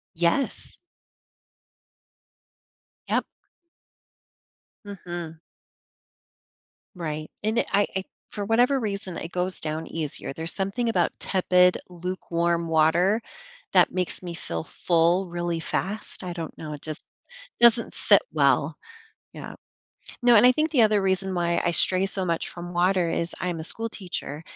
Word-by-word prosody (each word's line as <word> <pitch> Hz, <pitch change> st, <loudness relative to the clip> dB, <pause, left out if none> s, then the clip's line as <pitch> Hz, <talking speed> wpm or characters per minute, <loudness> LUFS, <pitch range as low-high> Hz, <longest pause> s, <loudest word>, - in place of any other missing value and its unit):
Yes. 170 Hz, -, -1 dB, 2.3 s
Yep. -, -, +1 dB, 1.6 s
Mhm. 175 Hz, -5 st, -7 dB, 1.6 s
Right, 155 Hz, -3 st, -4 dB
and 220 Hz, +2 st, +1 dB
i -, -, +1 dB, 0.2 s
I -, -, +1 dB
i 190 Hz, -, -2 dB, 0.3 s
for 205 Hz, -, -4 dB
whatever 245 Hz, +5 st, +3 dB
reason, 200 Hz, -5 st, -4 dB
it 165 Hz, -, -6 dB
goes 180 Hz, +1 st, -2 dB
down 155 Hz, +1 st, -3 dB
easier, 155 Hz, -4 st, -5 dB
there's 160 Hz, +3 st, -5 dB
something 195 Hz, +5 st, -1 dB
about 180 Hz, -6 st, 0 dB
tepid 180 Hz, -1 st, +3 dB
lukewarm 170 Hz, -1 st, -2 dB
water 165 Hz, +7 st, +3 dB, 0.5 s
that -, -, +5 dB
makes 180 Hz, -1 st, -2 dB
me 175 Hz, -2 st, -6 dB
feel 85 Hz, -, -4 dB
full 175 Hz, +2 st, +2 dB
really 175 Hz, -1 st, -2 dB
fast? 200 Hz, +4 st, -2 dB
I 180 Hz, -1 st, -4 dB
don't 165 Hz, -2 st, -6 dB
know, 155 Hz, -1 st, -6 dB
it 145 Hz, -, -8 dB
just 155 Hz, -1 st, -7 dB, 0.6 s
doesn't 235 Hz, -1 st, +5 dB
sit -, -, +5 dB
well, -, -, +2 dB, 0.6 s
yeah. -, -, -8 dB, 0.7 s
No, 240 Hz, 0 st, +6 dB
and 210 Hz, -, +7 dB
I -, -, +8 dB
think 310 Hz, +4 st, 0 dB
the 260 Hz, -7 st, +4 dB
other 210 Hz, -2 st, +4 dB
reason 190 Hz, 0 st, 0 dB
why 170 Hz, -1 st, +1 dB
I 175 Hz, -, +3 dB
stray 185 Hz, +2 st, +2 dB
so 195 Hz, -1 st, -1 dB
much 170 Hz, -2 st, -1 dB
from 175 Hz, 0 st, -8 dB
water 180 Hz, 0 st, +2 dB
is 170 Hz, +1 st, -2 dB
I'm 175 Hz, -3 st, -2 dB
a -, -, -6 dB
school 225 Hz, +6 st, -3 dB
teacher, 175 Hz, -8 st, -6 dB
180 Hz, 135 wpm, -25 LUFS, 170-200 Hz, 2.3 s, I